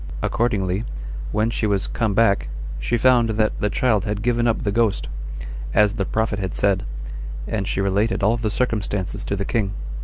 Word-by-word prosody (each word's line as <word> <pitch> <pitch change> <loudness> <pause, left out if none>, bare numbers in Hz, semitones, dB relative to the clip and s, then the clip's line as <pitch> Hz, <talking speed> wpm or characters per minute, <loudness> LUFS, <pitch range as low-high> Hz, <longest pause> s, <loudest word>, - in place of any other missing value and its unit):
Accordingly, 100 -4 +1 0.5
when 110 +2 +1
she 110 - 0
was 100 -2 +1
come 110 -4 -1
back, 100 - +3 0.3
she - - 0
found 120 -1 +4
that 110 -1 +1
the 105 - +1
child 110 -2 +2
had 105 0 -2
given 120 -1 +2
up 115 - +1
the 100 - 0
ghost, 115 -1 +1 0.7
as 105 -1 +5
the 100 -4 -1
prophet 110 -1 0
had 95 -2 -3
said; 100 -2 +2 0.6
and 100 -3 -2
she 100 - 0
related 100 +3 +1
all 110 +3 +4
the 115 -2 -1
circumstances 105 -4 -1
to 100 - -1
the 100 0 -2
king. 100 -4 0
105 Hz, 180 wpm, -22 LUFS, 100-115 Hz, 0.7 s, as